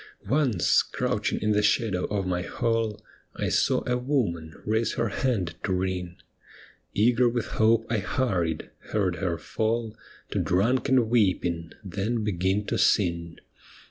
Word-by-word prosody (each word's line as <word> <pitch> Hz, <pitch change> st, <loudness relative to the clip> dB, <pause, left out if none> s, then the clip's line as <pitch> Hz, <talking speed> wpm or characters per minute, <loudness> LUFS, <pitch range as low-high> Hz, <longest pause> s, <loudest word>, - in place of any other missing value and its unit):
Once, 135 Hz, -, +3 dB
crouching -, -, -1 dB
in 105 Hz, -, +1 dB
the 105 Hz, 0 st, +3 dB
shadow 100 Hz, -2 st, +1 dB
of 100 Hz, -2 st, -2 dB
my 90 Hz, -1 st, -1 dB
hall 115 Hz, +2 st, -1 dB, 0.4 s
I -, -, -1 dB
saw -, -, +2 dB
a 125 Hz, 0 st, +1 dB
woman 105 Hz, -, -1 dB
raise 110 Hz, +2 st, +1 dB
her 115 Hz, -, 0 dB
hand 100 Hz, -7 st, -1 dB
to -, -, -1 dB
ring. 90 Hz, -1 st, -2 dB, 0.8 s
Eager 120 Hz, +3 st, +4 dB
with 120 Hz, -2 st, -2 dB, 0.2 s
hope 115 Hz, +1 st, +4 dB
I 115 Hz, -2 st, 0 dB
hurried 90 Hz, -8 st, -1 dB
— -, -, -43 dB, 0.2 s
heard 95 Hz, -4 st, +1 dB
her 90 Hz, -4 st, -1 dB
fall 110 Hz, 0 st, -2 dB, 0.4 s
To -, -, 0 dB
drunken 125 Hz, +5 st, +2 dB
weeping, 90 Hz, -7 st, +1 dB
then 105 Hz, +4 st, -2 dB
begin 95 Hz, 0 st, 0 dB
to -, -, -1 dB
sing. 85 Hz, -4 st, +1 dB
105 Hz, 140 wpm, -26 LUFS, 90-115 Hz, 0.8 s, Eager